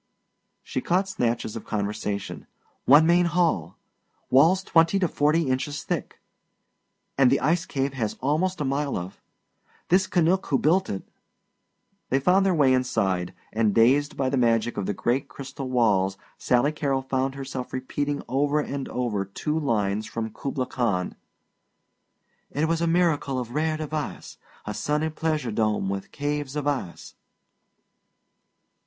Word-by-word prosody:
She 130 - -3
caught 185 +6 +1
snatches 120 - -1
of 115 - -6
conversation: 105 -1 -3 0.4
"One 145 +4 +7
main 175 +1 +4
hall" 165 - 0 0.5
"walls 165 +8 +5
twenty 165 +2 +3
to 185 -2 +2
forty 155 +2 +2
inches 140 +3 -2
thick" - - -4 1.0
"and 130 -2 +6
the 135 - +3
ice 165 +6 +1
cave 135 0 -1
has 115 -5 -3
almost 165 +7 0
a 145 - -1
mile 140 +1 -1
of 90 +2 -7 0.3
" - - -36
"this 185 +2 +4
Canuck 180 +2 +2
who 135 - +2
built 180 +6 +2
it 95 - -5 0.5
" - - -48
They 135 - +2
found 185 +7 +3
their 185 - +2
way 140 -4 +4
inside, 95 -8 0 0.2
and 110 -2 +1
dazed 140 +6 +3
by 135 - 0
the 135 +1 0
magic 115 0 +2
of 100 - -3
the 100 - -1
great 125 +6 0
crystal 135 -1 -7
walls 100 -6 +2 0.2
Sally 125 +4 +2
Carrol 140 -3 -1
found 130 0 -1
herself 135 -2 -6
repeating 140 +2 -3
over 145 +4 +1
and 140 -2 -4
over 115 -6 -1
two 150 +11 -3
lines 110 -6 0
from 110 -1 -4
"Kubla 135 -2 -3
Khan": 105 -9 -1 1.4
"It 150 +3 0
was 165 0 0
a 170 - +1
miracle 165 -6 +1
of 120 -1 -4
rare 155 +1 0
device, 155 -1 -5 0.3
A - - -4
sunny 150 +2 -1
pleasure 155 -5 -1
dome 105 -2 0
with 100 0 -4
caves 145 -1 -3
of 150 -1 -2
ice!" 135 -12 -3
135 Hz, 150 wpm, -25 LUFS, 115-155 Hz, 1.4 s, One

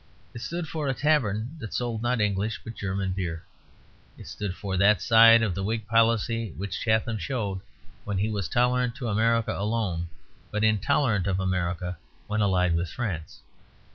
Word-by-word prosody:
It 120 - -8
stood 170 +7 -4
for 155 -2 -3
a 135 - 0
tavern 130 -4 +1
that 115 -6 -6
sold 120 -3 -2
not 120 0 0
English 105 +1 0
but 115 - -7
German 95 -2 -2
beer. 85 -3 -4 0.7
It - - -11
stood 100 -3 -5
for 100 -2 -4
that 100 +2 +4
side 115 0 +7
of 105 -5 0
the 95 +2 -3
Whig 110 +1 -2
policy 115 -2 +1
which 95 -1 -4
Chatham 110 0 +1
showed 105 -8 -3 0.4
when 100 -2 -3
he 100 +3 +1
was 100 -2 -2
tolerant 125 -1 +1
to 120 -4 -4
America 115 +2 +2
alone, 100 -5 -1 0.4
but 105 0 -2
intolerant 110 -1 +2
of 95 -1 0
America 90 -1 -2 0.3
when 105 +1 -1
allied 90 -4 +2
with 85 0 -1
France. 100 - -5
105 Hz, 170 wpm, -26 LUFS, 95-115 Hz, 0.7 s, side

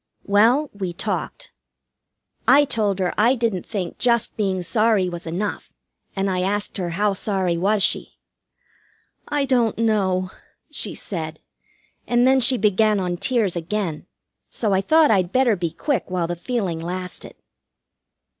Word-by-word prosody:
Well, 235 +9 +3
we 190 -4 -4
talked. 185 - -4 1.0
I 290 +1 +6
told 215 -7 0
her 185 -2 -1
I 235 +5 +4
didn't 225 -7 -2
think 195 -6 -4
just 235 -2 +1
being 190 -4 -1
sorry 215 -1 +2
was 175 -1 -7
enough, 185 +6 -4 0.4
and 195 0 0
I 185 -1 0
asked 205 +3 -1
her 180 -3 -2
how 205 0 +2
sorry 190 -3 -1
was 200 +4 +1
she. - - 0 1.1
"I 290 -1 0
don't 245 -4 +1
know," 190 -5 +1 0.4
she - - -3
said, 160 -6 -5 0.7
and 240 0 +3
then 265 +1 +5
she 255 +1 +2
began 210 0 +2
on 180 -2 -1
tears 205 -1 0
again, 170 -1 -3 0.4
so 215 -4 -1
I 190 - +2
thought 315 +5 +4
I'd 185 -4 +2
better 255 -2 +3
be 175 -3 -2
quick 270 - -2
while 180 -2 -1
the 175 +1 -3
feeling 185 -3 -2
lasted. 180 +2 -6
200 Hz, 145 wpm, -22 LUFS, 180-230 Hz, 1.1 s, I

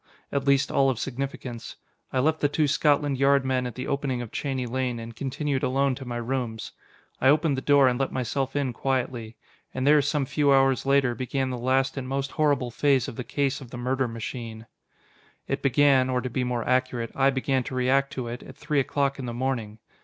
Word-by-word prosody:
At 140 -1 -2
least, 140 0 +3
all 135 -1 +3
of 130 - -1
significance. 130 -2 -5 0.4
I - - -2
left 155 +5 +2
the 145 - +2
two 150 +1 +1
Scotland 145 -1 +2
Yard 140 0 +4
men 130 -1 0
at 120 - -8
the 130 - -5
opening 140 -3 -1
of 115 - -10
Cheney 135 -3 -2
Lane, 125 0 -2
and 115 0 -8
continued 135 +2 -2
alone 135 +1 +1
to 135 +1 -8
my 120 -1 -4
rooms. 120 -2 -3 0.5
I 130 - +4
opened 150 0 +3
the 130 - -3
door 140 -1 +5
and 125 0 +1
let 135 - 0
myself 130 +2 -2
in 140 -3 0
quietly. 120 -3 -2 0.4
And 130 0 -1
there 150 +1 +6
some 145 0 0
few 145 +1 +2
hours 135 -1 +3
later, 135 -3 +3
began 130 +2 -2
the 125 - -3
last 130 +3 +1
and 130 -1 -4
most 135 +1 -2
horrible 145 -5 +1
phase 135 +1 +2
of - - -7
the 125 - -4
case 140 +2 -1
of 130 - -10
the 120 - -8
murder 130 +1 0
machine. 115 -1 -6 0.8
It - - -2
begin 135 -1 +4
or 125 -1 +1
to 125 0 -4
be 130 - -1
more 125 -1 -2
accurate, 125 -2 0
I 135 0 +3
began 130 0 0
to 130 - -5
react 135 +2 +2
to 125 -2 -4
it 120 +1 -6
at - - -12
three 150 -1 0
o'clock 140 0 0
in 130 - -4
the 120 - -4
morning. 120 -4 -2
130 Hz, 215 wpm, -26 LUFS, 125-140 Hz, 0.8 s, there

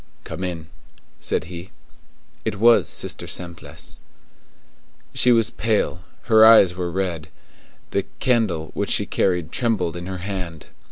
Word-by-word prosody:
"Come 95 - -6
in," 85 -3 -4 0.5
said - - -1
he. 85 +2 -9 0.7
It 110 -2 -2
was 115 +3 +5
Sister - - -3
Simplice. 80 -4 -6 1.1
She 125 - +4
was 115 -2 +3
pale; 105 -6 0 0.2
her 110 -1 +6
eyes 110 -5 +8
were 90 -1 -3
red; 85 -3 -3 0.6
the - - 0
candle 110 -11 +1
which - - -2
she - - +3
carried 90 -4 0
trembled 105 -9 0
in 85 +1 -6
her 95 0 -4
hand. 90 -4 -6
90 Hz, 130 wpm, -22 LUFS, 85-110 Hz, 1.1 s, eyes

